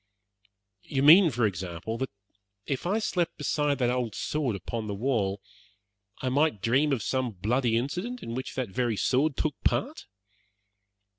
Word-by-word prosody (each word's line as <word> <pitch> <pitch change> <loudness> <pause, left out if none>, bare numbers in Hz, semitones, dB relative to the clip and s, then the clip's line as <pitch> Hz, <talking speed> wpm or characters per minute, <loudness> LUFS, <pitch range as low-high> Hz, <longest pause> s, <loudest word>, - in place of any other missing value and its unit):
"You 135 +4 -2
mean, 165 +5 +8
for 120 -4 +1
example, 95 +3 -4
that 130 - -2 0.6
if 135 +4 -3
I 200 +4 +1
slept 180 -6 -1
beside 145 -2 0
that 125 -2 +1
old 125 -4 -2
sword 145 -8 -1
upon 110 +4 -5
the 100 - -3
wall, 100 -4 -1 0.8
I 130 - +1
might 145 -3 +2
dream 135 +8 +2
of 125 -6 0
some 130 -3 -1
bloody 115 +5 +1
incident 180 - -3
in 115 - -5
which 130 +2 -5
that 130 -5 -2
very 115 +2 -1
sword 135 +5 +1
took 155 - 0
part?" 290 +7 -1
130 Hz, 155 wpm, -28 LUFS, 110-150 Hz, 0.8 s, mean